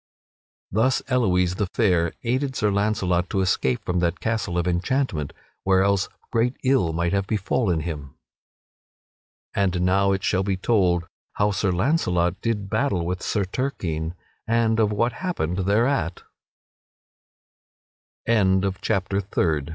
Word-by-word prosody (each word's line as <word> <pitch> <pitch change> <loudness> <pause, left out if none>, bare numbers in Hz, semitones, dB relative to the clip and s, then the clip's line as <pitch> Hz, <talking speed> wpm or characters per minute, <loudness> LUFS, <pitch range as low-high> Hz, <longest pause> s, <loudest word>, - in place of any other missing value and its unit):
Thus 115 +6 +2
Elouise 90 -8 +2
the 100 - 0
Fair 90 -7 +2
aided 130 +3 -1
Sir 105 -3 +1
Launcelot 95 -3 0
to 95 - 0
escape 65 -9 0
from 90 0 0
that 85 -1 0
castle 110 -6 -1
of 85 0 0
enchantment, 90 - -1 0.3
where 95 0 +3
else 100 0 +1 0.2
great 120 +3 +1
ill 130 -11 +2
might 85 +2 -1
have 100 -1 0
befallen 100 -4 0
him. 75 -4 -6 1.4
And 95 -3 +1
now 95 +2 +3
it 95 0 -1
shall 95 -1 +1
be 95 -1 -1
told 90 -4 +2 0.3
how 105 0 +1
Sir 100 0 0
Launcelot 90 - +1
did 105 -4 -1
battle 100 -7 0
with 90 +1 -3
Sir 100 -3 0
Turquine 90 - -3 0.3
and 115 -1 +2
of 105 -2 +3
what 115 +3 +1
ha 185 -1 -3
95 Hz, 120 wpm, -24 LUFS, 90-115 Hz, 1.4 s, where